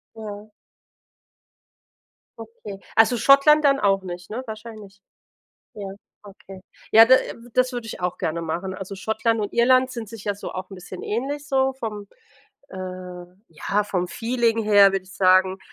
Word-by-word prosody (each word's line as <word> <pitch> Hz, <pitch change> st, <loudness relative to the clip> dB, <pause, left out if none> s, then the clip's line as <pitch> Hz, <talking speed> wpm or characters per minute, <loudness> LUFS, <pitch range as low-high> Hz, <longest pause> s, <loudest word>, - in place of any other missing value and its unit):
Ja. 210 Hz, -1 st, -9 dB, 1.9 s
Okay. 215 Hz, -3 st, -10 dB, 0.2 s
Also 225 Hz, +2 st, +5 dB
Schottland 285 Hz, +4 st, +5 dB
dann 275 Hz, -1 st, +4 dB
auch 195 Hz, -1 st, +2 dB
nicht, 180 Hz, 0 st, -8 dB
ne, 245 Hz, +4 st, -4 dB
wahrscheinlich? 215 Hz, -3 st, -10 dB, 0.7 s
Ja, 200 Hz, -2 st, -7 dB, 0.4 s
okay. 195 Hz, -1 st, -13 dB, 0.3 s
Ja, 225 Hz, +1 st, +9 dB
da 260 Hz, +2 st, +7 dB
w 240 Hz, -1 st, -5 dB
das 255 Hz, 0 st, +2 dB
würde 240 Hz, -2 st, -5 dB
ich -, -, -7 dB
auch 180 Hz, 0 st, -2 dB
gerne 165 Hz, +1 st, -3 dB
machen. 175 Hz, +4 st, -4 dB
Also 195 Hz, +1 st, -7 dB
Schottland 220 Hz, +3 st, -1 dB
und 205 Hz, -1 st, -4 dB
Irland 255 Hz, +2 st, +3 dB
sind 230 Hz, -4 st, -7 dB
sich 225 Hz, -3 st, -10 dB
ja 205 Hz, -, -1 dB
so -, -, -8 dB
auch 185 Hz, +1 st, -7 dB
'n -, -, -8 dB
bisschen 185 Hz, 0 st, -10 dB
ähnlich 275 Hz, +7 st, -3 dB
so 265 Hz, -1 st, +1 dB
vom 210 Hz, -5 st, -6 dB, 0.6 s
äh, -, -, -10 dB, 0.7 s
ja, 200 Hz, +6 st, -1 dB
vom 180 Hz, -3 st, -2 dB
Feeling 230 Hz, 0 st, 0 dB
her, 200 Hz, -2 st, +6 dB
würde 190 Hz, -1 st, -2 dB
ich 190 Hz, -, -15 dB
sagen, 185 Hz, 0 st, +3 dB
215 Hz, 160 wpm, -23 LUFS, 195-235 Hz, 1.9 s, Ja